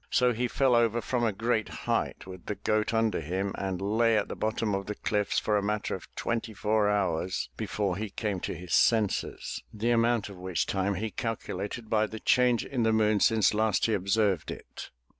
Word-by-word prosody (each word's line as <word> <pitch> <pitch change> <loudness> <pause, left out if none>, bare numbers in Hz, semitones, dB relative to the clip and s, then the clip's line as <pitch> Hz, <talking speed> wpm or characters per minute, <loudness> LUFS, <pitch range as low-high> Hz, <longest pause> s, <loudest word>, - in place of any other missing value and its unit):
So 125 -1 +3
he 125 +2 -1
fell 130 +1 +2
over 120 -1 +3
from 120 +1 -1
a 115 - +2
great 110 +1 -1 0.2
height - - -1
with 95 -1 -11
the 105 - -2
goat 110 +1 0
under 110 -3 +1
him 95 +5 -2
and 95 -2 -3
lay 110 +3 +2
at 105 - -1
the - - -4
bottom 110 -1 -1
of 100 0 -2
the 105 - -3
cliffs 105 -1 -1
for 105 -1 +2
a - - +1
matter 105 +1 -1
of - - -6
twenty 115 -2 -2
four 105 +1 +2
hours 95 -3 -1
before 100 -4 -2
he 110 +1 -3
came 100 -1 -2
to - - -4
his 90 +1 -6
senses 110 -4 +1
— - - -36
the 115 +3 -1
amount 115 -1 +2
of 100 -2 -10
which 90 -1 -1
time 100 +1 0
he 110 +3 -3
calculated 115 -2 -4
by 110 0 +2
the 110 - -7
change 125 -1 +3
in 130 -3 -2
the 110 -1 +3
moon 110 -1 +3
since 110 0 +4
last 110 -2 +2
he 115 - +1
observed 100 -2 +1
it. - - -8
105 Hz, 210 wpm, -28 LUFS, 100-115 Hz, 0.2 s, since